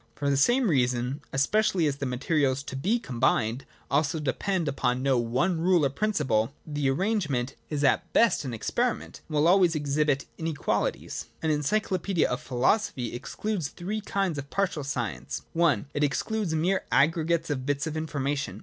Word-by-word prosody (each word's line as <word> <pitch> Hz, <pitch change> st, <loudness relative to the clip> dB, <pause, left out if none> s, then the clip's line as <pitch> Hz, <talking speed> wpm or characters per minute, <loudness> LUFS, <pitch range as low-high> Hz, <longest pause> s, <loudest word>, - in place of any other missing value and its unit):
For 140 Hz, -1 st, 0 dB
the -, -, +2 dB
same 240 Hz, -, +3 dB
reason, 125 Hz, -3 st, +1 dB
especially 175 Hz, +5 st, +2 dB
as 140 Hz, -2 st, 0 dB
the 140 Hz, -, -3 dB
materials 135 Hz, +1 st, 0 dB
to 135 Hz, -, -7 dB
be 195 Hz, -, +1 dB
combined 120 Hz, -, 0 dB, 0.3 s
also 155 Hz, +3 st, +1 dB
depend 165 Hz, +5 st, -1 dB
upon 130 Hz, -2 st, 0 dB
no 135 Hz, -3 st, +3 dB
one 130 Hz, +9 st, 0 dB
rule 175 Hz, -3 st, +4 dB
or 135 Hz, -, +1 dB
principle, 140 Hz, -, 0 dB
the 145 Hz, -3 st, -1 dB
arrangement 150 Hz, -, 0 dB, 0.2 s
is 145 Hz, -2 st, -2 dB
at 140 Hz, -, +2 dB
best 230 Hz, -9 st, +3 dB
an 130 Hz, -, -4 dB
experiment, 235 Hz, -, -2 dB
and 155 Hz, -, -5 dB
will 150 Hz, +2 st, +4 dB
always 180 Hz, -2 st, +5 dB
exhibit 145 Hz, -1 st, +1 dB
inequalities. 160 Hz, -3 st, -2 dB, 0.2 s
An 160 Hz, -, +2 dB
encyclopaedia 185 Hz, +3 st, +1 dB
of 125 Hz, -, -3 dB
philosophy 125 Hz, -, 0 dB
excludes 175 Hz, -, -3 dB
three 200 Hz, +8 st, -4 dB
kinds 195 Hz, -6 st, -1 dB
of 140 Hz, 0 st, -8 dB
partial 195 Hz, -7 st, -1 dB
science. 120 Hz, -, -4 dB
I. 165 Hz, -4 st, +3 dB
It 145 Hz, -, 0 dB
excludes 165 Hz, +6 st, 0 dB
mere 180 Hz, +5 st, +1 dB
aggregates 165 Hz, +2 st, +2 dB
of 130 Hz, -2 st, -3 dB
bits 145 Hz, +1 st, 0 dB
of 160 Hz, -1 st, -4 dB
information. 145 Hz, -2 st, -2 dB
150 Hz, 160 wpm, -27 LUFS, 135-175 Hz, 0.3 s, always